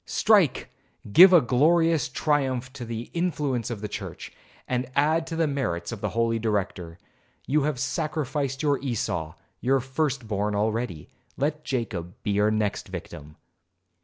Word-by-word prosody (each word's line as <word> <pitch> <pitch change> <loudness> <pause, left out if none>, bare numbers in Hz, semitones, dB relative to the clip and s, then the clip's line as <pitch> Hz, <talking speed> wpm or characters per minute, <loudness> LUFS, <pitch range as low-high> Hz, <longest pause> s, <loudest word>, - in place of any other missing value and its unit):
Strike! 200 - +3 0.4
give 185 - +10
a 175 -3 +7
glorious 155 +5 +3
triumph 130 -2 0
to 130 -3 -7
the 115 +1 -6
influence 150 -9 -1
of 115 -4 -5
the 105 - -3
church, - - -7 0.3
and 125 0 -2
add 155 +3 +2
to 165 - -4
the 165 0 +2
merits 135 - -2
of 115 -3 -7
the 105 - -1
holy 115 +1 0
Director. 100 -6 -2 0.5
You 145 +1 +1
have 150 -4 -1
sacrificed 145 0 -2
your 145 -2 +2
Esau, 90 - -3 0.2
your 135 +2 +2
first 130 -1 -2
born, 105 0 -1
already, 105 -6 -2 0.3
let 150 +2 -1
Jacob 105 - -3
be 105 - -1
your 105 +1 +3
next 110 -1 -1
victim.' 75 +1 -9
125 Hz, 150 wpm, -26 LUFS, 110-150 Hz, 0.5 s, give